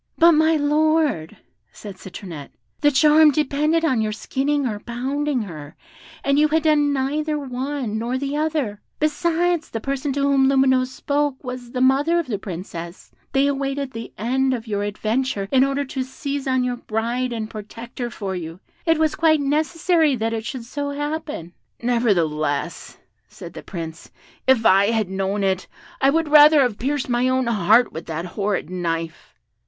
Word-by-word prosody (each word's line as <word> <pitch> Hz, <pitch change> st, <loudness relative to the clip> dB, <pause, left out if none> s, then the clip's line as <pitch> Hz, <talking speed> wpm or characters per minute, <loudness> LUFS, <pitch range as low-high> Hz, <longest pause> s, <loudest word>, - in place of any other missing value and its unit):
"But, 335 Hz, +1 st, +7 dB
my 315 Hz, +1 st, +4 dB
Lord," 300 Hz, -, +1 dB, 0.3 s
said 200 Hz, -3 st, -10 dB
Citronette, 175 Hz, -6 st, -9 dB, 0.3 s
"the 290 Hz, -, +4 dB
charm 300 Hz, +2 st, +6 dB
depended 300 Hz, +3 st, +1 dB
on 260 Hz, -8 st, +2 dB
your 215 Hz, -1 st, -1 dB
skinning 275 Hz, +6 st, -1 dB
or 215 Hz, -4 st, -2 dB
pounding 260 Hz, +3 st, -2 dB
her, 155 Hz, -7 st, -9 dB, 0.5 s
and 280 Hz, +1 st, +2 dB
you 305 Hz, -, +5 dB
had 315 Hz, +1 st, +1 dB
done 295 Hz, -2 st, +3 dB
neither 295 Hz, +3 st, -1 dB
one 260 Hz, -4 st, -3 dB
nor 240 Hz, +3 st, -2 dB
the 280 Hz, +2 st, -3 dB
other; 300 Hz, -9 st, -1 dB, 0.2 s
besides, 335 Hz, +2 st, 0 dB
the 225 Hz, -, -4 dB
person 275 Hz, +3 st, -2 dB
to 280 Hz, -, -1 dB
whom 275 Hz, -1 st, +3 dB
Lumineuse 260 Hz, -1 st, +3 dB
spoke 285 Hz, +1 st, -2 dB
was 250 Hz, -1 st, -6 dB
the 250 Hz, -, -2 dB
mother 280 Hz, +6 st, +3 dB
of 340 Hz, -, 0 dB
the 220 Hz, -7 st, -3 dB
Princess; 170 Hz, -2 st, -8 dB, 0.2 s
they 270 Hz, +1 st, +3 dB
awaited 275 Hz, -1 st, -2 dB
the 230 Hz, -2 st, -7 dB
end 260 Hz, +4 st, +1 dB
of 230 Hz, -2 st, -7 dB
your 205 Hz, -3 st, -2 dB
adventure 215 Hz, +1 st, -1 dB
in 265 Hz, -1 st, +5 dB
order 275 Hz, +1 st, 0 dB
to 265 Hz, 0 st, -4 dB
seize 275 Hz, +2 st, -4 dB
on 260 Hz, -1 st, +2 dB
your 250 Hz, -1 st, -2 dB
bride 235 Hz, +3 st, -2 dB
and 220 Hz, -2 st, -4 dB
protect 230 Hz, +3 st, -9 dB
her 240 Hz, -1 st, -2 dB
for 200 Hz, -5 st, -5 dB
you; 165 Hz, 0 st, -6 dB, 0.3 s
it 325 Hz, -1 st, +4 dB
was 315 Hz, -1 st, +2 dB
quite 315 Hz, -1 st, +3 dB
necessary 310 Hz, +2 st, +1 dB
that 225 Hz, -1 st, -2 dB
it 225 Hz, -1 st, -4 dB
should 260 Hz, -5 st, -6 dB
so 285 Hz, +4 st, -4 dB
happen." 290 Hz, -, -4 dB, 0.3 s
"Nevertheless," 170 Hz, -12 st, 0 dB, 0.3 s
said 170 Hz, -, -11 dB
the -, -, -8 dB
Prince, 165 Hz, -3 st, -7 dB, 0.4 s
"if 255 Hz, -4 st, +4 dB
I 195 Hz, +1 st, +5 dB
had 220 Hz, -4 st, 0 dB
known 195 Hz, +1 st, -1 dB
it, 190 Hz, -1 st, 0 dB, 0.3 s
I 270 Hz, -, +5 dB
would 320 Hz, +1 st, +1 dB
rather 300 Hz, 0 st, +8 dB
have 245 Hz, -5 st, 0 dB
pierced 275 Hz, +2 st, -1 dB
my 245 Hz, +1 st, +1 dB
own 260 Hz, 0 st, +1 dB
heart 230 Hz, +1 st, +3 dB
with 160 Hz, -, -7 dB
that 165 Hz, +1 st, -4 dB
horrid 200 Hz, +2 st, -2 dB
knife!" 165 Hz, -2 st, -4 dB
260 Hz, 170 wpm, -22 LUFS, 215-290 Hz, 0.5 s, rather